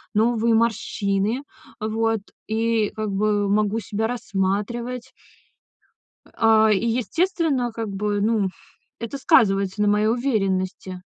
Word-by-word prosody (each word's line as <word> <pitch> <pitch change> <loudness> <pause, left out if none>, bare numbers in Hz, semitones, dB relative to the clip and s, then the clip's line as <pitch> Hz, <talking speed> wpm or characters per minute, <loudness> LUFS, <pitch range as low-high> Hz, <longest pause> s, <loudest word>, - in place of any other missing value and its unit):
новые 230 +1 +2
морщины, 220 +1 0 0.4
а 215 - -2
вот, 225 0 0 0.3
и, 225 -1 +1
как 215 -1 -3
бы, 205 +1 +1
могу 210 +1 +1
себя 215 +1 -2
рассматривать. 235 +3 -2 1.1
А, 220 -1 +3
и, 210 +3 +1
естественно, 265 - 0
как 225 -1 -4
бы, 205 +1 -1
ну, 210 -2 +1 0.5
это 230 +4 -5
сказывается 195 -5 +3
на 205 - +3
моей 210 +1 +3
уверенности. 190 -6 -1
220 Hz, 115 wpm, -23 LUFS, 205-235 Hz, 1.1 s, А